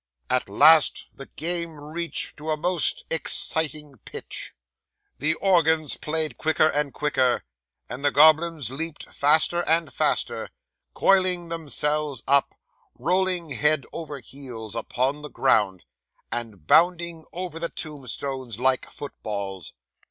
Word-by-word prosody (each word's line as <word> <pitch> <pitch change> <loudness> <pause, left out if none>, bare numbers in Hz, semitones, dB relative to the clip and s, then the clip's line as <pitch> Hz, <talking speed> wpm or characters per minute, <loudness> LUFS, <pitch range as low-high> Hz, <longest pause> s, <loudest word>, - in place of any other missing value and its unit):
'At 130 -5 +1
last 155 +9 +5
the 135 - -11
game 170 -1 -3
reached 160 +3 -3
to 155 +1 -7
a 155 - +1
most 175 +1 +2
exciting 155 -4 -1
pitch; - - -7 0.7
the 155 +3 +1
organ 160 -5 +3 0.2
played 155 -4 -2
quicker 155 0 +3
and 145 -1 -1
quicker, 130 -4 +1 0.4
and 130 +3 -7
the 145 - +4
goblins 155 -2 +4
leaped 160 +3 -6
faster 155 +4 +3
and 160 -4 +1
faster, - - 0 0.5
coiling 185 -3 +2
themselves 150 -4 0
up, 140 0 +3 0.4
rolling 180 +3 0
head 150 +1 +1
over 150 -4 -6
heels 120 -4 -10
upon 130 +5 -1
the 150 - -8
ground, 100 -10 +2 0.5
and 110 -8 -4
bounding 170 - +3
over 175 -2 -6
the 170 0 -2
tombstones 135 -5 -5
like 130 +1 +1
footballs. 100 - -6
150 Hz, 120 wpm, -25 LUFS, 130-165 Hz, 0.7 s, last